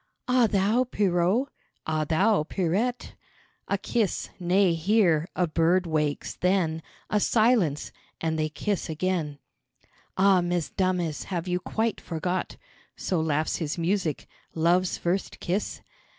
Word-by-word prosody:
"Ah 250 -2 +4
thou, 210 +4 +2
Pierrot?" 195 +2 +1 0.4
"Ah 155 -1 0
thou, 190 +5 +3
Pierrette?" 195 +9 -1 0.5
A 200 - +1
kiss, 215 0 -1
nay, 180 0 +3
hear 170 -2 +2
a 180 - +2
bird 170 +3 +2
wakes, 150 -3 -1
then 180 -4 +1 0.3
A 210 - +3
silence 215 - +2 0.3
and 160 -1 -1
they 155 0 0
kiss 185 +5 -2
again, 160 -2 -1 0.8
"Ah, 190 -1 +5
Mesdames, 175 -1 -1
have 180 -2 -3
you 180 0 0
quite 220 +3 -2
forgot 180 +2 -3 0.2
" - - -32
(So 180 -4 -1
laughs 155 0 0
his 160 -1 -3
music.) 170 -3 -1 0.3
"Love's 175 +3 +2
first 180 +2 -2
kiss? 190 +4 -2
180 Hz, 125 wpm, -26 LUFS, 160-200 Hz, 0.8 s, Ah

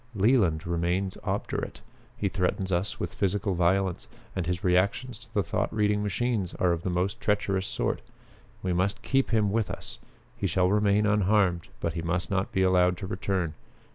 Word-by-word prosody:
Leland 100 -7 +3
remains 85 +3 0
obdurate. - - -3 0.4
He 100 - 0
threatens 95 0 -1
us 90 +3 -1
with - - -3
physical 100 0 0
violence, 90 +1 +1 0.3
and 90 -3 -2
his 90 +2 -2
reactions 100 +6 +1
to 115 -1 -14
the 100 - +3
thought 105 +4 -1
reading 105 -1 +1
machines 105 -2 -1
are 90 - +2
of 85 -1 -1
the 90 - -2
most 90 +3 -1
treacherous 100 -2 +1
sort. - - -1 0.6
We 90 -1 0
must 100 +6 0
keep 135 +4 +1
him 110 -3 +2
with 110 -1 0
us. - - -7 0.4
He - - -1
shall 90 0 +2
remain 105 0 +3
unharmed, 100 -4 +2
but 85 - -1
he 85 - -3
must 90 +3 -2
not 95 0 0
be 95 - +2
allowed 90 -1 +4
to 95 - -5
return. 95 -3 -1
95 Hz, 175 wpm, -28 LUFS, 90-105 Hz, 0.6 s, allowed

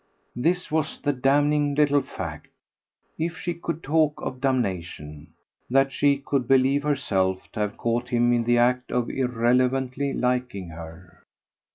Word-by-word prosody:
This 170 +9 0
was 155 -1 -1
the 145 - 0
damning 145 +2 +2
little 145 -1 +3
fact 85 - -7 0.7
if 165 +1 -2
she 175 - -3
could 170 -1 -5
talk 150 0 +1
of 130 0 -5
damnation: 85 - -3 0.4
that 135 +2 +3
she 140 +1 +2
could 140 -3 -2
believe 135 +1 +4
herself 95 -11 0
to - - -7
have 105 -1 -2
caught 120 +2 -1
him 120 -1 +3
in 120 -1 +2
the 120 0 +3
act 125 +1 +2
of 125 -1 0
irrelevantly 130 +2 +1
liking 125 -7 -1
her. 85 +2 -11
125 Hz, 145 wpm, -25 LUFS, 115-145 Hz, 0.7 s, believe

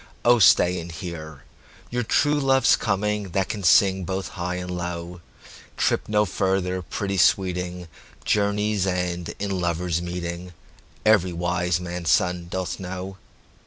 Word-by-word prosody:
O 120 0 +6
stay 90 -2 +5
and 85 0 -7
hear! 80 -3 -8 0.5
your 125 0 0
true 145 +6 +2
love's 135 -1 +4
comingThat 100 -2 -1
can 105 - -4
sing 95 +1 +4
both 95 +2 -3
high 90 0 -4
and 90 0 -4
low; 85 0 -5 0.6
Trip - - 0
no 105 0 +3
further, 95 -1 -1
pretty 95 +4 -3
sweeting, 90 -1 +1 0.4
Journeys 105 -1 +1
end 90 -1 -2
in 100 -2 -2
lovers' 85 0 -1
meeting—Every 90 +2 -2
wise 90 0 0
man's 90 -1 -4
son 90 -4 +2
doth 95 0 -3
know. 95 +1 -6
90 Hz, 125 wpm, -24 LUFS, 85-100 Hz, 0.6 s, O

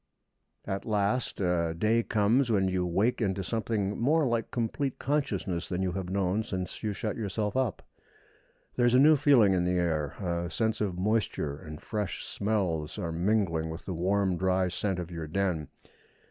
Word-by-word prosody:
At 95 0 -3
last 105 +3 0
a 85 -3 +1
day 110 +5 +3
comes 115 +4 +2
when 95 -3 +3
you 90 -1 0
wake 100 +9 +1
into 95 -2 0
something 105 0 -1
more 150 +5 +3
like 115 -1 -1
complete 125 +3 -2
consciousness 120 - -1
than 95 0 -1
you 95 - 0
have 90 0 -4
known 95 +2 +1
since 95 -5 -5
you 110 - -1
shut 105 +1 -3
yourself 105 0 -2
up. 130 -6 0 0.9
There 120 - +2
is 120 - +3
a - - +7
new 155 +3 +7
feeling 135 -9 +5
in 90 -1 +2
the 90 0 +1
air; 80 -5 0
a 85 -3 -2
sense 110 +2 -1
of 95 -4 -1
moisture 95 -7 0
and 75 +1 -9
fresh 105 -3 -4
smells 95 -8 -1
are 85 - -3
mingling 85 -2 +1
with 80 +2 -7
the 95 - -3
warm 95 +1 +1
dry 95 0 +1
scent 95 +1 -2
of 90 -1 -5
your 80 -2 -5
den. 85 -2 -1
95 Hz, 175 wpm, -29 LUFS, 90-110 Hz, 0.9 s, a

